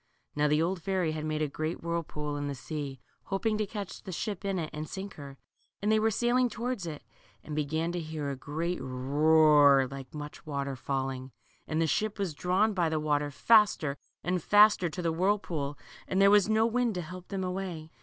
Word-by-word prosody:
Now 150 0 +2
the 150 +2 +3
old 175 +1 -1
fairy 185 -3 0
had 155 0 -4
made 155 0 -1
a - - +1
great 155 +4 -4
whirlpool 155 -3 -3
in 145 0 -3
the 140 - -3
sea, 140 -1 -5 0.3
hoping 215 +3 0
to 215 - 0
catch 200 -2 -6
the 190 - -8
ship 205 +2 -4
in 195 -1 -1
it 160 -3 -3
and 155 0 -5
sink 195 +1 -6
her, 140 -2 -10 0.4
and 210 +2 +1
they 220 - +4
were 220 +1 +3
sailing 240 +3 +2
towards 235 -4 -3
it, 150 -3 -6 0.4
and 150 - -6
began 160 +3 -1
to 175 - -2
hear 155 -3 -4
a - - -3
great 160 +6 -3
roar 145 +1 +5
like 135 -1 -8
much 150 0 -7
water 140 -3 -3
falling. 130 0 -3 0.3
And 155 - -1
the 165 - +3
ship 215 +6 0
was 195 -6 -2
drawn 185 +7 +1
by 175 -4 +1
the 160 -1 0
water 145 -1 0
faster 195 - +4 0.3
and 180 0 0
faster 205 -2 +5
to 170 +3 -5
the 165 - +1
whirlpool, 170 -6 -1 0.3
and 190 - 0
there 195 0 +6
was 205 0 +5
no 220 +1 +4
wind 235 -1 +1
to 180 - -3
help 180 +2 -9
them 195 -2 -3
away. 180 -4 -4
165 Hz, 205 wpm, -29 LUFS, 150-195 Hz, 0.4 s, there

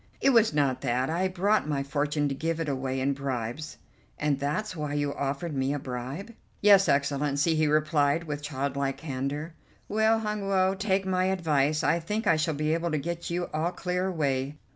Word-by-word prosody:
"It 275 - +4
was 230 -3 +5
not 140 -4 +1
that. 125 +4 0
I 180 +3 +1
brought 190 -2 +1
my 140 -2 0
fortune 145 +1 0
to 140 - -1
give 165 +3 -2
it 165 - -2
away 135 -1 -2
in 135 +2 +1
bribes." 135 +1 -4 0.4
"And 145 -2 0
that's 170 +9 -2
why 150 -2 -3
you 145 -1 0
offered 140 +4 -3
me 135 +2 0
a - - -1
bribe?" 135 - -6 0.3
"Yes, 200 -4 +6
Excellency," 140 +2 +1
he 155 -1 +2
replied 155 0 +2
with 150 -2 -4
childlike 140 -1 -2
candour. 145 +2 -4 0.3
"Well, 220 +2 +3
Hun 210 -2 -3
Woe, 190 -1 +3
take 195 -1 0
my 185 -1 +1
advice. 155 -5 +1
I 165 +4 +3
think 210 +7 -3
I 165 - +5
shall 155 0 0
be 155 +2 0
able 170 +1 0
to 155 - 0
get 170 +3 -4
you 175 +1 -1
all 160 +3 0
clear 180 +1 -1
away. 140 -5 -1
150 Hz, 190 wpm, -28 LUFS, 140-180 Hz, 0.4 s, Yes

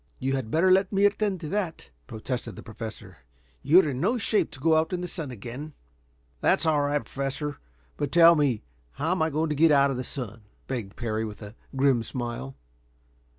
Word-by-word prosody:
"You 135 +1 -1
had 130 -5 -3
better 170 +8 +3
let 190 +1 +4
me 200 0 +3
attend 205 -2 +1
to 155 - -5
that," 180 - -3 0.2
protested 120 +3 -5
the - - -10
Professor. 110 0 -8 0.4
"You're 170 +2 +5
in 135 -2 -3
no 225 +7 +2
shape 220 -1 +1
to 130 - -12
go 160 +3 +3
out 160 +3 +1
in 180 - -1
the 180 - -3
sun 160 -6 -3
again." 125 +6 -7 0.7
"That's - - +2
all 155 -2 +3
right, 145 0 0
Professor. 140 +2 -4 0.4
But 145 -2 -2
tell 170 0 +8
me 140 -8 +1 0.3
how 150 +4 -2
I 160 - +3
am - - -4
going 155 +2 0
to 150 - -1
get 160 +3 +5
out 140 -2 +5
of 130 - -3
the 125 - -3
sun?" 115 -5 -6 0.2
begged 115 -7 -5
Parry, 110 -2 -2
with 105 0 -7
a 105 0 -9 0.2
grim 135 -3 +3
smile. 125 +2 -5
145 Hz, 200 wpm, -26 LUFS, 125-165 Hz, 0.7 s, tell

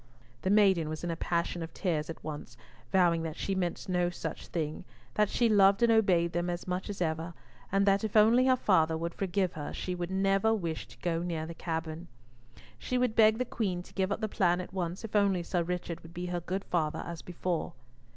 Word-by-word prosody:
The - - -1
maiden 190 -6 +4
was 155 +1 -5
in 175 - -1
a - - -2
passion 170 +1 -1
of 165 - -7
tears 160 -5 -1
at 165 - -7
once, 145 -6 -7 0.3
vowing 175 -3 +4
that 160 -1 -4
she 195 - -2
meant 180 -3 -2
no 180 -1 +1
such 175 - -6
thing, 155 -3 -3 0.3
that 210 -1 +2
she 240 - +2
loved 200 0 +5
and 235 - +5
obeyed 185 -6 +3
them 175 +1 -1
as 175 +1 -4
much 180 +3 -3
as 195 -3 -2
ever, 160 +1 -3 0.4
and 195 +1 +3
that 200 +1 +3
if 220 0 0
only 235 +4 +6
her 260 - +6
father 165 -9 +3
would 170 +1 -3
forgive 190 -1 -1
her 150 -2 -5
she 180 - -3
would 175 -1 -3
never 195 +3 +2
wish 170 -6 -4
to - - -16
go 170 -2 0
near 165 -3 -2
the 170 - -6
cavern. 165 0 -4 0.7
She 255 - -1
would 250 -3 +1
beg 220 -1 +6
the 255 - 0
Queen 190 -7 -2
to - - -17
give 190 0 0
up 205 - -2
the 215 - 0
plan 180 -4 +2
at 180 - -7
once, 180 +1 -3
if 215 - -7
only 195 -4 +3
Sir 175 +1 0
Richard 175 -1 -3
would 165 +1 -14
be 175 +1 -3
her 175 0 -2
good 185 +3 -3
father 155 -3 -1
as 170 -1 -6
before. 175 -1 -3
180 Hz, 225 wpm, -30 LUFS, 170-195 Hz, 0.7 s, only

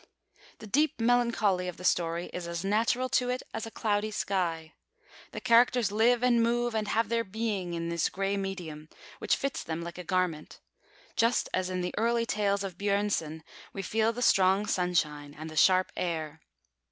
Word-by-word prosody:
The - - -11
deep 290 +8 +1
melancholy 230 -6 +2
of 180 - -6
the 180 - -10
story 170 -1 0
is 175 -1 -5
as 170 0 -4
natural 230 +5 +1
to 250 -1 +1
it 250 +1 -2
as 225 0 -4
a - - -6
cloudy 215 -1 -1
sky. 170 -6 -2 0.6
The - - -5
characters 235 -2 +4
live 235 +3 +3
and 240 -2 +4
move 240 +1 +1
and 215 -1 -1
have 225 0 +1
their 230 +1 0
being 200 -4 -3
in 170 0 -3
this 170 0 0
grey 195 +1 -1
medium, 175 -6 -5 0.3
which - - +2
fits 275 -1 -3
them 165 +1 -4
like 170 +1 -7
a - - -5
garment; 180 -4 -2 0.6
just 230 +1 +2
as 185 0 0
in 185 -1 -2
the 180 - -3
early 230 +1 +1
tales 200 -2 0
of 185 -3 -6
Björnson 200 -6 -1 0.3
we 195 - -5
feel 220 +3 +1
the 245 +2 -4
strong 190 -1 +4
sunshine 150 -6 -1
and 155 +1 -7
the - - -9
sharp 185 +3 +4
air. 160 -3 -3
195 Hz, 180 wpm, -29 LUFS, 170-230 Hz, 0.6 s, characters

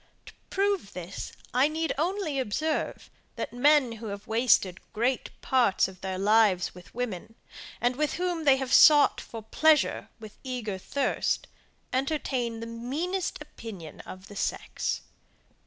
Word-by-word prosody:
To - - -12 0.2
prove 390 - 0
this, 180 +1 -6 0.2
I 255 +3 +4
need 320 +1 -1
only 325 -1 -1
observe, 295 +7 -2 0.3
that - - -4
men 280 0 +4
who 225 0 -7
have 200 0 -6
wasted 220 -5 +3
great 245 +4 0
part 245 -9 +3
of 190 -1 -13
their 190 -1 -3
lives 205 -2 +3
with 180 +2 -15
women, 225 -3 -4 0.4
and 245 +1 +1
with 300 +2 0
whom 350 -2 -1
they 275 -3 +6
have 265 -1 -2
sought 295 -2 +7
for 225 -2 -9
pleasure 305 +7 +3
with 215 -2 -12
eager 240 -7 -4
thirst, 280 +8 -1 0.5
entertain 255 -4 -1
the - - -4
meanest 285 +12 -3
opinion 200 - -10
of 185 +1 -11
the 205 - -12
sex. - - -2
245 Hz, 140 wpm, -28 LUFS, 210-300 Hz, 0.5 s, sought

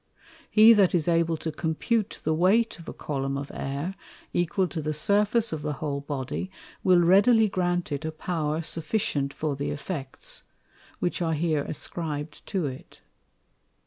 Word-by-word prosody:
He 220 +2 +8
that 195 -4 +4
is 165 -2 +1
able 165 -1 +2
to 160 - -4
compute 185 +8 -1
the 160 - +1
weight 195 +7 +3
of 165 - -9
a - - -4
Column 135 -2 -3
of 140 0 -5
Air, 140 +7 -3 0.4
equal 175 +2 +1
to 165 - -4
the 155 0 -2
Surface 210 +6 +2
of 155 - -3
the 150 0 -2
whole 140 0 -3
Body, 140 +5 -4 0.3
will 180 -2 +5
readily 205 +6 +5
grant 175 -3 -1
it 140 - -2
a 160 - -2
power 155 -1 -2
sufficient 160 -4 0
for 150 0 -2
the 140 +1 -3
Effects, 145 -2 -5 0.6
which 175 - -2
are 165 -1 +1
here 155 -2 +1
ascrib'd 150 -1 -4
to 190 -6 -1
it. 130 -2 -8
160 Hz, 160 wpm, -26 LUFS, 150-185 Hz, 0.6 s, He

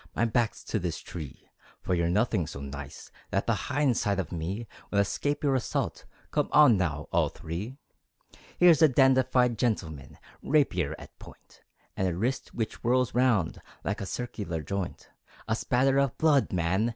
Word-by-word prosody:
My 115 - +2
back's 115 -1 0
to 110 - -2
this 85 -3 -3
tree, 75 -6 -9 0.4
For - - -1
you're 85 -1 +1
nothing 90 -3 +1
so 70 - -7
nice 70 -1 -8 0.2
That - - 0
the - - +2 0.2
hind 140 -4 +2
side 100 -1 0
of 85 -5 -3
me 95 +7 -4 0.2
Would 100 - +1
escape 145 +9 -1
your 140 -2 +3
assault. 130 -3 -2 0.3
Come - - 0
on 150 -6 +7
now, 80 -5 -1
all - - +3
three! 100 - -6 0.8
Here's 175 -3 +6
a 160 - +9
dandified 130 -3 +3
gentleman, 80 - -2 0.2
Rapier 90 - +1
at - - -14
point, - - -16 0.3
And 95 - 0
a 90 - -1
wrist 120 +8 -2
which 110 -2 -3
whirls 125 +1 +1
round 120 -10 +2 0.2
Like 100 - -2
a 100 - -4
circular 100 -10 -4
joint. 100 0 -4 0.4
A 110 - +1
spatter 135 +4 +2
of 140 -3 0
blood, 150 -4 +3
man! 95 +6 +1
110 Hz, 165 wpm, -28 LUFS, 85-130 Hz, 0.8 s, a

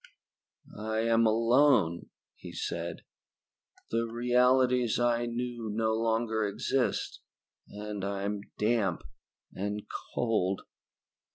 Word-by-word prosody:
"I 110 +1 -1
am 115 0 +3
alone," 115 - +3 0.2
he - - -11
said. - - -4 0.9
"The 115 +1 +1
realities 125 +1 +3
I 120 0 +2
knew 120 -1 -4
no 110 +1 +1
longer 110 0 0
exist, 115 +5 -1 0.5
and 105 -1 -6
I 100 0 -2
am 100 0 -2 0.2
damp 105 -6 +1 0.5
and 105 +1 -3 0.3
cold. 105 -5 0
115 Hz, 95 wpm, -30 LUFS, 105-120 Hz, 0.9 s, am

